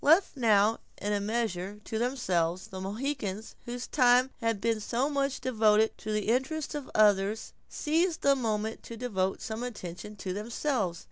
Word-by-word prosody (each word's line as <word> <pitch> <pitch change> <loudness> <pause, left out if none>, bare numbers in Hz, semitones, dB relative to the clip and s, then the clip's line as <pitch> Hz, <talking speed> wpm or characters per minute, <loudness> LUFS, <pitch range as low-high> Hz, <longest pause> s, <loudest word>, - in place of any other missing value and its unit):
Left 325 +6 +5
now 220 -3 +4 0.2
in 205 +1 -1
a 205 - +1
measure 210 -3 -2
to 220 - -3
themselves, 185 -9 0
the 190 0 -6
Mohicans, 215 0 -3
whose 245 +1 -4
time 250 -1 +4
had 230 -2 0
been 225 +1 +1
so 245 +7 0
much 275 -1 0
devoted 220 -4 +3
to 215 - -4
the 215 0 0
interests 265 +6 0
of 290 -3 -5
others, 210 0 +3 0.2
seized 325 +3 0
the 280 0 +5
moment 220 -3 -2
to 230 - -9
devote 195 -6 -1
some 220 +1 -4
attention 210 -4 -6
to 190 -2 -4
themselves. 210 - -1
225 Hz, 160 wpm, -29 LUFS, 205-255 Hz, 0.2 s, Left